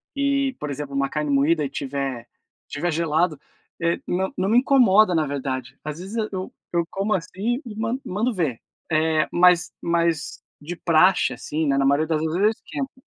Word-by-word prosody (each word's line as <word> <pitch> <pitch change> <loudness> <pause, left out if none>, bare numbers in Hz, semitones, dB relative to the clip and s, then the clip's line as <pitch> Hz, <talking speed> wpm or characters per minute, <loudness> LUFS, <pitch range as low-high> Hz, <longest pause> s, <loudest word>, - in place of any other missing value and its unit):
e, 275 -1 +1
por 150 - -4
exemplo, 140 0 -5
uma 140 0 +1
carne 150 -1 -2
moída 150 +3 +3
e 140 - 0
estiver 135 -3 -4 0.4
estiver 165 +4 -2
gelado, 160 -1 +1 0.4
eh, 170 0 +1
não 190 +2 -1
não 190 +1 0
me 230 - +4
incomoda, 215 -8 +5
na 160 -3 +1
verdade. 130 -2 -4
Às 150 +2 -5
vezes 195 +5 -7 0.2
eu 185 -1 -5 0.2
eu 170 -1 +1
como 200 +2 -1
assim, 200 - -2
e 215 - -8
man 225 +4 -2
mando 220 +7 -1
ver. 155 - -1 0.3
Eh, 155 0 +2
mas 180 -1 +4
mas 170 -2 0 0.2
de 165 +4 -6
praxe, 175 -3 +3
assim, 155 +5 -3
né, 135 - +2
na 135 - +2
maioria 145 +3 +3
das 155 -2 0
vezes, 160 +2 -1
eu 210 - +5
esquento. 265 +4 -6
170 Hz, 180 wpm, -23 LUFS, 145-195 Hz, 0.4 s, incomoda